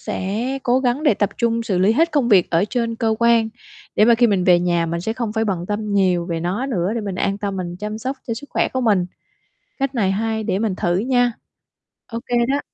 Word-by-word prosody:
sẽ 205 +7 -3
cố 255 0 +2
gắng 255 +3 0
để 290 -9 +4
tập 205 - 0
trung 230 -1 +1
xử 190 -5 -1
lý 195 +4 +4
hết 330 +6 +2
công 275 -5 +2
việc 190 -5 +4
ở 170 +3 +3
trên 230 -2 -1
cơ 225 -2 +1
quan, 235 -1 +3 0.5
để 210 - +6
mà 235 0 +6
khi 240 +1 +4
mình 195 -4 +1
về 175 -1 +5
nhà 175 -1 +1
mình 170 +1 -3
sẽ 220 +6 -2
không 230 -3 -3
phải 220 0 0
bận 180 -4 -2
tâm 210 0 -3
nhiều 180 -3 +2
về 165 -2 -3
nó 190 +10 -2
nữa, 195 -5 -1
để 230 - -1
mình 200 -3 -4
an 195 +2 -1
tâm 200 -2 -3
mình 175 -1 -4
chăm 210 +2 -5
sóc 265 +4 -4
cho 230 - -2
sức 285 +5 -9
khỏe - - +1
của 260 - -2
mình, 200 -7 +2 0.7
cách 275 0 -1
này 200 -5 +1
hay 220 +2 -1
để 195 -3 0
mình 210 -3 -1
thử 175 0 0
nha. 245 +2 +2 0.8
OK 235 +2 -5 0.3
đó. 280 +1 +1
215 Hz, 245 wpm, -20 LUFS, 185-235 Hz, 0.8 s, để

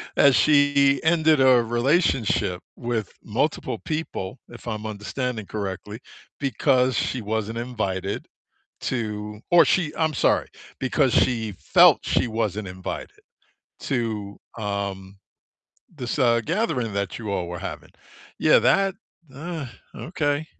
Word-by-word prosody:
that 140 -2 +6
she 145 -2 +4
ended 160 -2 +4
a 130 -2 +6
relationship 120 - +1
with 115 -5 -3
multiple - - -1
people, 150 -9 -4
if 120 0 -12
I'm 110 -2 -4
understanding 110 +2 -4
correctly, 105 +1 -5 0.4
because 130 -2 +2
she 130 - -1
wasn't 110 +1 -2
invited 100 -5 -3 0.6
to 105 -3 -3
Or 175 -1 +7
she 165 -1 +1
I'm 160 -1 +1
sorry, - - +2 0.3
because 130 0 +2
she 115 -4 +2
felt 90 - +5
she - - +1
wasn't 110 -3 -2
invited 90 0 -7 0.6
to, 110 -5 -3 0.2
um, 100 -2 -4 0.8
this, 125 0 -4
uh, 120 -3 +4
gathering 155 - -1
that 100 -2 -3
you 110 -3 -5
all 90 -3 -1
were 90 0 -5
having. - - -7 0.5
Yeah, - - +5
that 195 -1 +3 0.4
uh, 160 0 -5 0.3
okay. 155 -2 -2
120 Hz, 120 wpm, -24 LUFS, 105-140 Hz, 0.8 s, Or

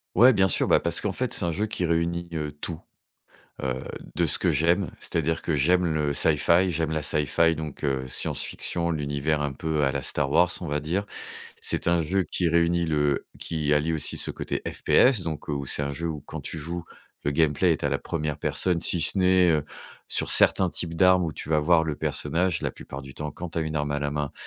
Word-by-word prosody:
Ouais, 125 +3 +8
bien 95 -4 +3
sûr, - - +2
bah, - - +6
parce - - -1
qu'en - - -1
fait, - - -2
c'est - - +1
un 85 - 0
jeu 105 +7 -1
qui 90 -4 -2
réunit, 85 +1 -1
heu, 75 -2 -3
tout, 85 -2 -5 0.8
heu, 65 -1 -2 0.3
de - - +2
ce - - -1
que - - +2
j'aime. 85 +4 +2
C'est-à-dire 80 0 -2
que 80 - 0
j'aime 90 +6 +3
le 75 -3 0
sci-fi 85 +5 +3
j'aime 80 -1 -1
la 80 -1 -2
sci-fi 80 +3 +2
donc 75 -2 -7
heu, 65 -2 -1
science-fiction, 85 +6 -3
l'univers 75 -1 -1
un 70 -1 -2
peu 75 +1 -1
à 70 - +2
la 70 0 -2
Star 70 0 -1
Wars, 85 +2 +4
on - - -4
va 75 0 -1
dire. 85 +7 -2 0.6
C'est - - 0
un 85 0 +3
jeu 95 +5 +1
qui 90 - +1
réunit 85 +1 +2
le 75 -3 0
qui 75 -3 0
allie 75 +2 +1
aussi 80 - -1
ce - - -3
côté - - -4
FPS, 125 -6 +3
donc 80 -3 -5
où 70 -2 -2
c'est 75 - -1
un 70 0 -2
jeu 85 +4 -4
où 80 -3 -4
quand - - -7
tu 80 - -6
joues, 85 +3 -5 0.4
le 70 - +1
gameplay 80 +3 +3
est 80 - -3
à 70 - +1
la 70 0 0
1re 75 -3 -3
personne, 90 -2 0
si 85 +1 +2
ce 95 - +2
n'est, 90 -1 +4
heu, 75 -3 +1 0.4
sur - - -2
certains 95 -2 +4
types 85 -1 -4
d'armes 90 +1 +4
où 80 - -3
tu - - -8
vas 80 -1 +3
voir 80 +2 +4
le 80 -2 -2
personnage, 90 +4 0
la - - -1
plupart 70 +1 -9
du 70 0 -11
temps 75 -1 -5
quand 90 +2 -7
tu 85 - -3
as - - +1
une 80 0 -4
arme 75 -1 -1
à 70 - 0
la 70 0 -2
main. 75 -2 -2
80 Hz, 230 wpm, -26 LUFS, 75-85 Hz, 0.8 s, Ouais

